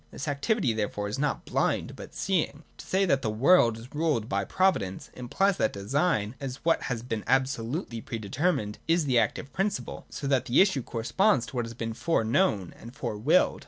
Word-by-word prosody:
This 140 Hz, -, -7 dB
activity 145 Hz, -, +1 dB
therefore 105 Hz, -1 st, -2 dB
is 105 Hz, -, -4 dB
not 145 Hz, 0 st, -1 dB
blind -, -, 0 dB
but -, -, -11 dB
seeing. 165 Hz, -5 st, -1 dB, 0.2 s
To -, -, -9 dB
say 195 Hz, +1 st, +2 dB
that 140 Hz, -7 st, +2 dB
the 110 Hz, -, -1 dB
world 115 Hz, +1 st, +4 dB
is 115 Hz, +3 st, -12 dB
ruled 150 Hz, -8 st, 0 dB
by 100 Hz, -1 st, 0 dB
Pro 190 Hz, -, +3 dB
vidence 95 Hz, -, -6 dB
implies 185 Hz, +11 st, 0 dB
that 110 Hz, -, +1 dB
design, 110 Hz, -, 0 dB
as 135 Hz, -2 st, -4 dB
what 165 Hz, -, +3 dB
has 115 Hz, -3 st, -3 dB
been 115 Hz, -4 st, -3 dB
absolutely 130 Hz, -1 st, 0 dB
pre 115 Hz, -, -5 dB
determined, 110 Hz, -, -1 dB
is 165 Hz, -1 st, +3 dB
the 125 Hz, -4 st, +3 dB
active 125 Hz, +4 st, -2 dB
principle, 195 Hz, +4 st, -2 dB
so -, -, -6 dB
that 135 Hz, -3 st, +2 dB
the 120 Hz, -, +3 dB
issue 190 Hz, -9 st, +4 dB
corresponds 125 Hz, -, +1 dB
to -, -, -11 dB
what 120 Hz, -1 st, 0 dB
has 115 Hz, 0 st, -8 dB
been 115 Hz, -1 st, -4 dB
fore 120 Hz, +3 st, 0 dB
known 110 Hz, -, +1 dB
and 120 Hz, +3 st, -11 dB
fore 120 Hz, -6 st, -3 dB
willed. 145 Hz, +12 st, +3 dB
125 Hz, 200 wpm, -28 LUFS, 115-165 Hz, 0.2 s, world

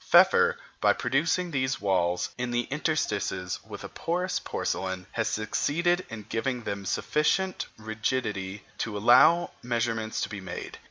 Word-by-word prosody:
Pfeffer, -, -, +6 dB, 0.2 s
by -, -, +5 dB
producing 165 Hz, +8 st, 0 dB
these 130 Hz, -2 st, 0 dB
walls 90 Hz, -3 st, +1 dB
in 125 Hz, 0 st, -3 dB
the 120 Hz, 0 st, +1 dB
interstices 105 Hz, -, -1 dB
of -, -, -7 dB
a -, -, -5 dB
porous 180 Hz, +2 st, -1 dB
porcelain, 95 Hz, -1 st, -3 dB
has 110 Hz, -, -1 dB
succeeded 170 Hz, +11 st, 0 dB
in 115 Hz, -2 st, -7 dB
giving 125 Hz, +1 st, -2 dB
them 100 Hz, -2 st, -4 dB
sufficient 185 Hz, -, +1 dB
rigidity 110 Hz, -3 st, -2 dB, 0.2 s
to 105 Hz, -2 st, -2 dB
allow 130 Hz, +11 st, +6 dB
measurements 115 Hz, -2 st, -1 dB
to -, -, -1 dB
be 100 Hz, -3 st, -6 dB
made. 90 Hz, -2 st, -7 dB
115 Hz, 140 wpm, -28 LUFS, 100-150 Hz, 0.2 s, Pfeffer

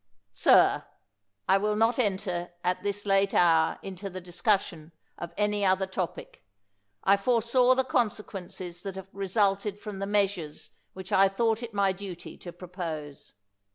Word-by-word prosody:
Sir, 100 Hz, -, +4 dB, 0.6 s
I 195 Hz, +1 st, +4 dB
will 210 Hz, +1 st, 0 dB
not 225 Hz, +3 st, +2 dB
enter 190 Hz, -5 st, -1 dB
at 180 Hz, 0 st, 0 dB
this 205 Hz, 0 st, -3 dB
late 195 Hz, 0 st, +2 dB
hour 165 Hz, -2 st, +4 dB
into 195 Hz, +1 st, -6 dB
the 185 Hz, 0 st, -7 dB
discussion 175 Hz, -3 st, -1 dB, 0.3 s
of 170 Hz, -1 st, -6 dB
any 210 Hz, 0 st, +1 dB
other 190 Hz, 0 st, +3 dB
topic. 185 Hz, -3 st, -5 dB, 0.6 s
I 200 Hz, -, +5 dB
foresaw 245 Hz, +4 st, +3 dB
the 265 Hz, -, +2 dB
consequences 195 Hz, -7 st, -3 dB
that 195 Hz, 0 st, -6 dB
have 190 Hz, 0 st, -10 dB
resulted 200 Hz, +1 st, 0 dB
from 205 Hz, -1 st, -8 dB
the 195 Hz, -, -3 dB
measures 195 Hz, -7 st, -1 dB, 0.2 s
which 190 Hz, 0 st, -10 dB
I 195 Hz, 0 st, +5 dB
thought 225 Hz, +3 st, 0 dB
it 230 Hz, -3 st, -7 dB
my 200 Hz, -1 st, +3 dB
duty 190 Hz, -2 st, -8 dB
to 175 Hz, -, -9 dB
pro 180 Hz, +1 st, -11 dB
pose. 155 Hz, -6 st, -6 dB
195 Hz, 155 wpm, -28 LUFS, 180-210 Hz, 0.6 s, I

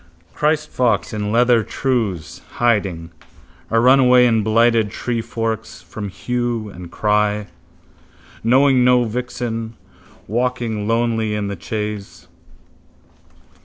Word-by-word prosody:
Christfox 130 Hz, -, 0 dB
in 105 Hz, -1 st, -2 dB
leather 120 Hz, 0 st, +4 dB
trews, 110 Hz, -, -2 dB
hiding, 95 Hz, -8 st, 0 dB, 0.6 s
a 115 Hz, -, +2 dB
runaway 125 Hz, 0 st, +6 dB
in 115 Hz, -2 st, +3 dB
blighted 115 Hz, 0 st, +3 dB
treeforks, 115 Hz, -1 st, -4 dB
from 105 Hz, -2 st, -7 dB
hue 120 Hz, 0 st, -3 dB
and 90 Hz, -2 st, -10 dB
cry. 105 Hz, 0 st, +1 dB, 1.0 s
Knowing 130 Hz, +2 st, +4 dB
no 125 Hz, 0 st, +4 dB
vixen, 115 Hz, -1 st, -4 dB, 0.5 s
walking 115 Hz, -2 st, -2 dB
lonely 115 Hz, -2 st, 0 dB
in 105 Hz, -1 st, -2 dB
the 100 Hz, -, -4 dB
chase. 105 Hz, +3 st, -6 dB
115 Hz, 95 wpm, -19 LUFS, 105-125 Hz, 1.0 s, runaway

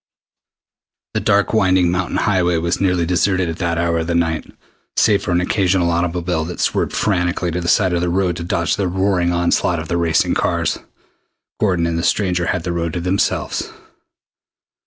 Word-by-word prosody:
The -, -, 0 dB
dark 100 Hz, 0 st, +1 dB
winding 95 Hz, -4 st, +3 dB
mountain 90 Hz, 0 st, -1 dB
highway 90 Hz, -4 st, +1 dB
was 85 Hz, +3 st, -1 dB
nearly 90 Hz, -3 st, +1 dB
deserted 90 Hz, +1 st, +1 dB
at 80 Hz, -, -4 dB
that 85 Hz, -2 st, -1 dB
hour 85 Hz, -1 st, 0 dB
of 80 Hz, -, -3 dB
the 85 Hz, -, -1 dB
night. 80 Hz, -2 st, -1 dB, 0.5 s
Save 105 Hz, -3 st, +3 dB
for -, -, -5 dB
an 90 Hz, 0 st, +2 dB
occasional 90 Hz, -2 st, +1 dB
automobile 85 Hz, -1 st, -1 dB
that 85 Hz, +1 st, -7 dB
swerved -, -, 0 dB
frantically 90 Hz, -3 st, 0 dB
to 90 Hz, +2 st, -2 dB
the 85 Hz, -, -4 dB
side 95 Hz, 0 st, +3 dB
of 85 Hz, -, 0 dB
the 90 Hz, -, 0 dB
road 90 Hz, -1 st, 0 dB
to 85 Hz, -, -5 dB
dodge 85 Hz, 0 st, -1 dB
the 100 Hz, -2 st, 0 dB
roaring 95 Hz, -1 st, +1 dB
onslaught 85 Hz, 0 st, +1 dB
of 80 Hz, 0 st, -6 dB
the 85 Hz, -, 0 dB
racing 80 Hz, -3 st, +1 dB
cars, -, -, 0 dB, 0.8 s
Gordon 90 Hz, -5 st, +1 dB
and 85 Hz, 0 st, -1 dB
the -, -, -3 dB
stranger 90 Hz, -4 st, +1 dB
had 90 Hz, -, -1 dB
the 85 Hz, -1 st, -2 dB
road 85 Hz, -1 st, -2 dB
to 90 Hz, -, -2 dB
themselves. 90 Hz, +3 st, -1 dB
90 Hz, 185 wpm, -19 LUFS, 85-95 Hz, 0.8 s, winding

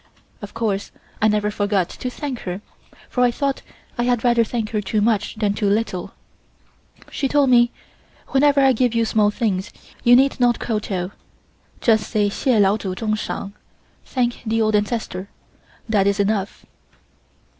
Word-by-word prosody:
Of 205 Hz, -, -9 dB
course 210 Hz, -4 st, -2 dB, 0.3 s
I 215 Hz, -, +5 dB
never 210 Hz, 0 st, +1 dB
forgot 205 Hz, -3 st, 0 dB
to 250 Hz, -, -5 dB
thank 260 Hz, -1 st, -5 dB
her, 180 Hz, +2 st, -5 dB, 0.5 s
for 250 Hz, -, -2 dB
I 245 Hz, -, +5 dB
thought 275 Hz, +3 st, -2 dB, 0.4 s
I -, -, +2 dB
had 245 Hz, -2 st, +1 dB
rather 240 Hz, -1 st, +4 dB
thank 225 Hz, -1 st, -3 dB
her 215 Hz, -2 st, 0 dB
too 210 Hz, +2 st, -1 dB
much 210 Hz, -1 st, +1 dB
than 210 Hz, -2 st, 0 dB
too 205 Hz, -1 st, 0 dB
little. 200 Hz, -3 st, -1 dB, 1.0 s
She 275 Hz, -, -1 dB
told 280 Hz, -1 st, +3 dB
me: 240 Hz, 0 st, +5 dB, 0.6 s
"Whenever 280 Hz, +1 st, +4 dB
I 270 Hz, -1 st, +5 dB
give 245 Hz, 0 st, +1 dB
you 230 Hz, 0 st, +2 dB
small 215 Hz, -1 st, +2 dB
things 210 Hz, -3 st, -1 dB, 0.3 s
you 240 Hz, 0 st, +7 dB
need 270 Hz, +1 st, +3 dB
not 245 Hz, -1 st, +3 dB
kowtow. 200 Hz, -5 st, -3 dB, 0.7 s
Just 220 Hz, -2 st, +2 dB
say: 210 Hz, -2 st, +1 dB
'Hsieh 240 Hz, +2 st, +1 dB
Lao 200 Hz, +1 st, +4 dB
Tsu 190 Hz, -3 st, -4 dB
Tsung 215 Hz, +1 st, -1 dB
Shang' 200 Hz, -2 st, -4 dB, 0.5 s
(Thank 245 Hz, -2 st, -1 dB
the 225 Hz, 0 st, 0 dB
old 215 Hz, -1 st, +2 dB
ancestor), 205 Hz, -3 st, -2 dB, 0.6 s
that 205 Hz, -3 st, +2 dB
is 200 Hz, 0 st, +1 dB
enough." 200 Hz, 0 st, -1 dB
220 Hz, 165 wpm, -21 LUFS, 205-240 Hz, 1.0 s, you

